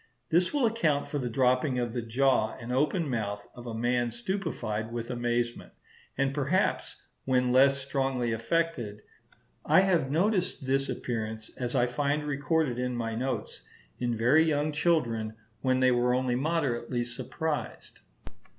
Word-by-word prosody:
This 175 +2 +3
will 285 -4 +2
account 190 -11 +1
for 145 - -3
the 125 -2 -2
dropping 130 +2 +2
of 120 -2 -1
the 120 - -2
jaw 120 -1 +1
and 120 +2 -5
open 150 +5 +1
mouth 105 -5 -3
of 120 0 -10
a 115 - -4
man 120 +1 +1
stupefied 120 - -3
with 115 0 -4
amazement, 120 0 -2 0.4
and 135 0 +1
perhaps 150 +7 0 0.3
when 125 -1 +2
less 135 +2 +5
strongly 135 -3 -1
affected. 115 -4 -1 0.6
I 185 - +5
have 180 -8 +2
noticed 180 -1 +1
this 135 +1 +1
appearance, 110 -3 -4
as 125 -1 -3
I 120 - +4
find 145 +4 0
recorded 145 -2 0
in 125 0 -1
my 115 -1 -2
notes, 130 +4 -3 0.4
in 120 -2 -1
very 130 +8 +5
young 155 -1 +1
children 120 -9 0 0.3
when 130 -1 +2
they 130 0 +5
were 125 0 +2
only 130 -1 0
moderately 130 -4 0
surprised. 135 +6 -4
130 Hz, 150 wpm, -29 LUFS, 120-150 Hz, 0.6 s, less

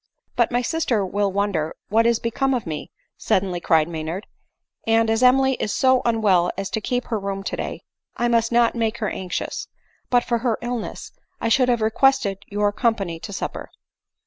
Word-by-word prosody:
" - - -50
But - - +2
my 245 +1 +1
sister 250 - 0
will 200 +1 0
wonder 190 -6 -1
what 225 +2 +3
is 235 -1 +3
become 265 +4 0
of 240 - -3
me," 155 -3 -5 0.3
suddenly 185 -2 0
cried 160 -3 +3
Maynard; 165 +4 -5 0.3
" - - -38
and 225 0 +3
as 225 +1 +1
Emily 265 +1 +5
is 210 - -1
so 260 -1 +4
unwell 210 -7 +3
as 195 -1 -4
to 220 - -2
keep 245 +4 -1
her 225 -3 0
room 195 0 -4
today, - - -4 0.3
I 240 - +1
must 230 -1 +2
not 235 0 +4
make 230 -1 -1
her 215 -4 -2
anxious. 180 -2 -4 0.4
But 245 -1 +3
for 235 -1 0
her 230 -2 0
illness, 240 -2 -5 0.3
I 230 - -1
should 250 +2 +3
have 240 -2 +2
requested 220 -3 +2
your 205 0 0
com 230 +2 +1
pany 170 -6 -5
to - - -7
supper." 195 - -5
225 Hz, 195 wpm, -22 LUFS, 195-240 Hz, 0.4 s, Emily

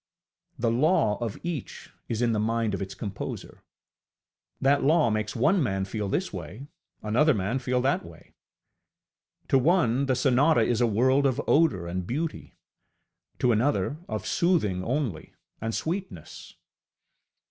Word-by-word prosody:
The 115 -1 +1
law 140 - +2
of 115 -3 -3
each 165 -7 -6 0.2
is 115 +1 -1
in 120 - +2
the 110 - 0
mind 115 0 0
of 100 - -3
its 95 0 -5
composer; 100 -3 -6 1.0
that 140 +1 +2
law 145 -5 +3
makes 110 0 -2
one 175 - +3
man 95 -7 -1
feel 105 0 -4
this 185 - -2
way, 95 - -7 0.4
another 125 +7 +3
man 105 +6 -1
feel 125 0 0
that 135 +2 +1
way. 85 -1 -15 1.2
To 135 - +4
one 135 -4 +2
the 130 - +2
sonata 135 +2 +3
is 120 +1 +1
a 120 - +4
world 130 +6 +3
of 130 - -1
odour 130 - +3
and 90 +1 -4
beauty, 155 +6 -4 0.8
to 125 - +2
another 140 +5 +1
of - - -4
soothing 155 - +1
only 120 - -3 0.3
and 115 0 -2
sweetness. 160 - -5
120 Hz, 145 wpm, -26 LUFS, 105-140 Hz, 1.2 s, To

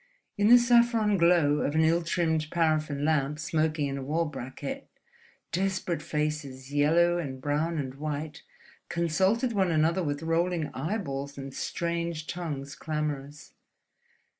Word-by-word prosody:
In 205 0 +2
the 240 +2 +9
saffron 235 -3 +4
glow 170 -5 +4
of 145 - -1
an 160 - +4
ill 165 +2 +3
trimmed 165 -2 0
paraffin 155 -4 0
lamp 150 -2 +1
smoking 155 -1 0
in 140 0 -3
a - - -5
wall 160 +5 0
bracket, 135 -1 -6 0.6
desperate 190 -1 -1
faces, 145 -3 -3
yellow 170 +4 +3
and 135 -5 -5
brown 150 +4 -1
and 130 -3 -3
white, 150 +1 -5 0.5
consulted 190 +9 +1
one 190 -3 +2
another 165 +3 +2
with 145 0 -3
rolling 165 0 0
eyeballs 140 -4 -3
and 135 -1 -7
strange 170 -1 -3
tongues 145 -6 -5
clamorous. 150 -1 -4
155 Hz, 135 wpm, -28 LUFS, 145-170 Hz, 0.6 s, the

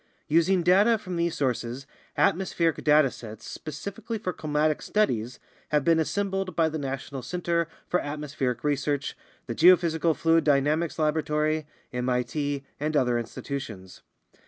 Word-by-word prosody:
Using 170 +3 +3
data 200 +6 +5
from 185 -4 -6
these 170 0 0
sources, 125 -1 -2 0.3
atmospheric 170 -3 +1
data 150 -3 +5
sets 110 -1 -10
specifically 200 - -6
for 185 -4 -3
climatic 150 0 0
studies 125 - 0 0.3
have 150 -2 +2
been 165 -1 +4
assembled 195 +2 -1
by 165 -1 +3
the 155 0 -4
National 135 -1 -4
Center 170 +1 -1 0.2
for 180 - +1
Atmospheric 145 -4 -3
Research, 145 -1 -1 0.3
the 120 - -4
Geo 180 +9 +8
physical 165 -2 0
Fluid 165 0 +3
Dynamics 150 +3 +2
Laboratory, 155 0 0 0.3
MIT, 130 +3 -1 0.2
and 155 +1 0
other 125 -3 +2
institutions. 115 -6 -6
155 Hz, 135 wpm, -27 LUFS, 135-170 Hz, 0.3 s, Geo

